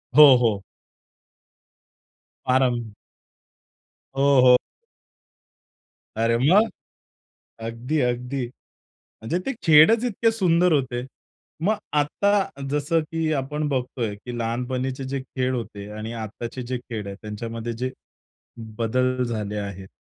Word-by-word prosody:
हो, 150 -3 +10
हो. 110 -5 +1 1.9
आराम. 120 -4 +2 1.2
हो, 140 -1 +4
हो. 125 - +8 1.6
अरे, 115 +1 +2
मग? 190 - +4 1.0
अगदी-अगदी. 125 +1 -1
म्हणजे 120 +3 -8
ते 270 - 0
खेळच 165 +9 +6
इतके 230 -1 +2
सुंदर 180 -4 +3
होते. 130 -4 0 0.6
मग 215 +3 +3 0.2
आता 195 0 0
जसं 150 +3 +1
की 160 0 -2
आपण 150 +3 -2
बघतोय 125 -5 -2
की 120 +4 -8
लहानपणीचे 125 +3 -2
जे 135 0 -3
खेळ 130 0 -2
होते 105 -4 -6
आणि 110 +2 -6
आत्ताचे 115 +3 -6
जे 125 +1 -3
खेळ 115 -4 -6
आहेत, 100 - -6
त्यांच्यामध्ये 115 +2 -5
जे 125 +3 -3 0.9
बदल 125 +2 +1
झाले 105 -3 -3
आहेत, 100 -2 -6
125 Hz, 105 wpm, -24 LUFS, 115-150 Hz, 1.9 s, हो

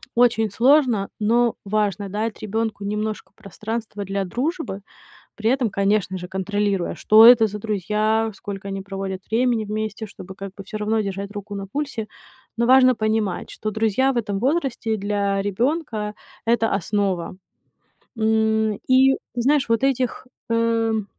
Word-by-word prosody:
очень 230 -3 +3
сложно, 245 -3 +3
но 235 +2 +2
важно 200 -1 -1
дать 215 +2 -3
ребёнку 220 0 -2
немножко 210 +1 -3
пространства 215 0 -6
для 195 0 -2
дружбы, 255 - -3 0.5
при 220 +1 0
этом, 245 -6 -1
конечно 195 -1 0
же, 180 - -8
контролируя, 195 0 -1
что 215 - +3
это 230 -1 +9
за 210 +1 -6
друзья, 215 +2 0
сколько 200 -1 -7
они 195 0 -4
проводят 195 -1 -5
времени 235 -1 +2
вместе, 215 +1 -4
чтобы 190 -1 -11
как 195 0 -8
бы 195 0 -10
всё 215 +2 -6
равно 215 +1 0
держать 200 0 -4
руку 205 0 -7
на 195 0 -5
пульсе. 245 -1 -4 0.5
Но 235 - +2
важно 255 0 +6
понимать, 215 -4 -1
что 215 - -4
друзья 225 +5 +1
в - - -7
этом 205 -4 -1
возрасте 255 -4 0
для 200 -1 -1
ребёнка- 220 - -1 0.3
это 230 -1 +2
основа. 190 -3 -1 0.8
М, 220 -1 +2
и 265 +1 +6 0.2
знаешь, 270 +2 +2
вот 230 +2 +1
этих, 260 -2 0 0.2
эм, 230 -2 +1
215 Hz, 145 wpm, -22 LUFS, 200-230 Hz, 0.8 s, это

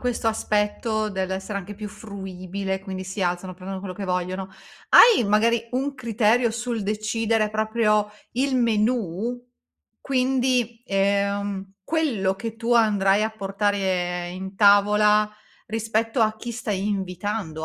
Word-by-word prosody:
questo 245 -2 0
aspetto 215 0 0
dell'essere 190 +1 -3
anche 200 +2 -8
più 210 0 -7
fruibile, 190 -2 -5
quindi 190 -1 -6
si 190 +2 -6
alzano, 180 +1 -1
prendono 190 +1 -7
quello 185 -2 -6
che 200 - -5
vogliono, 185 +1 -2 0.4
hai 450 - +8
magari 230 +3 +2
un 275 +3 -1
criterio 235 -1 +2
sul 235 -1 -3
decidere 215 +1 0
proprio 215 -1 +1 0.2
il 260 +2 0
menù? 230 0 0 0.6
Quindi, 255 -3 0
ehm, 200 0 0
quello 240 -13 0
che 225 +2 -6
tu 230 +1 -1
andrai 205 -3 +3
a 220 - 0
portare 195 -4 -1
in 190 +2 -7
tavola 210 +1 +5 0.4
rispetto 225 +2 -1
a 215 -1 +2
chi 240 +1 -6
stai 210 -4 -3
invitando? 190 -4 -3
210 Hz, 125 wpm, -24 LUFS, 195-230 Hz, 0.6 s, hai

